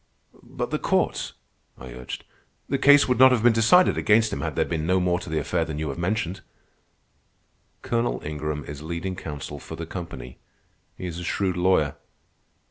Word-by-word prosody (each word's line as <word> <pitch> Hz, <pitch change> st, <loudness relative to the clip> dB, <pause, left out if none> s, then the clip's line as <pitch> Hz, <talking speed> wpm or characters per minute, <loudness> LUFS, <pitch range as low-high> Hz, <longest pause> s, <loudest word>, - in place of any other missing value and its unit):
"But -, -, -5 dB
the -, -, 0 dB
courts," -, -, 0 dB, 0.4 s
I 60 Hz, 0 st, -10 dB
urged. 60 Hz, 0 st, -7 dB, 0.4 s
"The 140 Hz, -, -1 dB
case 145 Hz, +1 st, +6 dB
would 125 Hz, -2 st, +1 dB
not 130 Hz, 0 st, +8 dB
have 120 Hz, -3 st, +2 dB
been 120 Hz, -1 st, +6 dB
decided 115 Hz, +12 st, +5 dB
against 110 Hz, +1 st, +3 dB
him 70 Hz, -, -3 dB
had 80 Hz, 0 st, -3 dB
there -, -, +2 dB
been 80 Hz, -1 st, -3 dB
no 95 Hz, +1 st, +3 dB
more 90 Hz, -1 st, +1 dB
to 90 Hz, -, -9 dB
the 80 Hz, -, -1 dB
affair 80 Hz, +3 st, 0 dB
than 80 Hz, -2 st, -5 dB
you 75 Hz, -1 st, -2 dB
have 70 Hz, -, -5 dB
mentioned." 90 Hz, 0 st, -2 dB, 1.4 s
"Colonel 120 Hz, 0 st, 0 dB
Ingram 75 Hz, -1 st, -4 dB
is 75 Hz, 0 st, -8 dB
leading 85 Hz, +4 st, -4 dB
counsel 75 Hz, -5 st, -7 dB
for -, -, -8 dB
the -, -, -6 dB
company. -, -, -8 dB, 0.6 s
He -, -, -6 dB
is 85 Hz, -1 st, -5 dB
a -, -, -6 dB
shrewd 95 Hz, +1 st, -1 dB
lawyer." 90 Hz, -5 st, +2 dB
85 Hz, 185 wpm, -25 LUFS, 75-110 Hz, 1.4 s, not